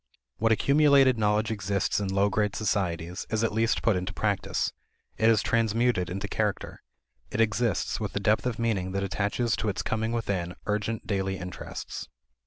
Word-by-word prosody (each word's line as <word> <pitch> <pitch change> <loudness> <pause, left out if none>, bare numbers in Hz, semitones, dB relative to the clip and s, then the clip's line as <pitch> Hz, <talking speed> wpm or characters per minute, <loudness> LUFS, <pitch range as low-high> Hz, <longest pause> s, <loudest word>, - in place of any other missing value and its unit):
What 115 +1 +2
accumulated 140 0 +5
knowledge 105 +1 +2
exists 100 -2 0
in 100 - -2
low 100 +1 +2
grade 105 0 0
societies 90 -5 -2
is 110 0 0
at 115 - +1
least 115 +1 +1
put 115 - +3
into 90 0 -3
practice; 100 -4 -1 0.4
it 110 - +3
is 110 -2 +4
transmuted 115 -4 +1
into 100 +3 -4
character; 105 -1 -2 0.5
it - - -4
exists 115 -4 +1
with 105 -3 -3
the - - -1
depth 105 +4 +2
of 120 -3 -2
meaning 100 -6 -1
that 100 0 -1
attaches 100 +4 0
to 105 +2 -1
its 95 - -2
coming 110 0 -1
within 95 -7 -2
urgent 105 +2 -2
daily 95 -1 -1
interests. 90 0 -7
105 Hz, 170 wpm, -27 LUFS, 95-115 Hz, 0.5 s, accumulated